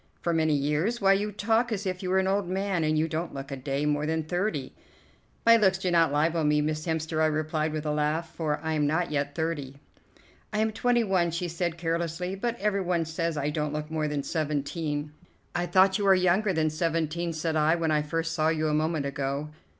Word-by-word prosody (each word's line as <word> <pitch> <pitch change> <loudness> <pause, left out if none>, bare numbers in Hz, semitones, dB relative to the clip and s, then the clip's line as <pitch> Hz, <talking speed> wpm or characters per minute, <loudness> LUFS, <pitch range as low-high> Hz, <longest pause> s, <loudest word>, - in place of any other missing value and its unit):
"For 170 - -1
many 160 -2 +2
years? 150 +11 0
Why, 195 -1 +5
you 205 +2 0
talk 225 +4 +1
as 200 -2 -2
if 185 -1 -2
you 185 - -3
were 190 - +2
an 190 - +2
old 195 -1 0
man, 190 -2 0
and 155 0 +1
you 155 +1 +2
don't 165 +1 -4
look 135 +1 -6
a - - -2
day 135 +2 -2
more 150 0 0
than 160 0 0
thirty." 175 -4 -2 0.7
"My 230 0 +8
looks 190 -4 +3
do 185 -1 -1
not 165 -3 +4
libel 160 +3 +1
me, 150 0 +3
Miss 155 +2 -2
Hemster," 160 0 -1
I 155 - +4
replied 155 0 -1
with 155 0 -4
a 150 - 0
laugh, 155 +2 -1
"for 155 -3 -1
I 160 0 -1
am 150 -2 +1
not 165 +3 0
yet 140 -1 -1
thirty." 150 -5 -3 0.7
"I 210 - -2
am 220 +1 +2
twenty 240 +2 +2
one," 185 -4 +2
she 170 +2 -2
said 170 0 -2
carelessly, 170 +2 -2
"but 235 +4 -3
every 200 -1 +1
one 175 -2 0
says 160 0 -2
I 145 +1 -1
don't 150 -1 -2
look 150 +1 -4
more 155 -1 0
than 145 -1 -2
seventeen." 150 -1 -2 0.4
"I 175 0 -1
thought 190 +2 +4
you 205 - 0
were 195 -1 +6
younger 185 +3 +2
than 160 -3 +1
seventeen," 165 +1 -1
said 160 0 -2
I, 155 +1 +3
"when 165 -2 0
I 150 -1 +3
first 165 +2 -2
saw 155 -1 +1
you 155 -1 0
a - - 0
moment 155 -1 0
ago." 140 +1 -3
160 Hz, 225 wpm, -27 LUFS, 150-185 Hz, 0.7 s, My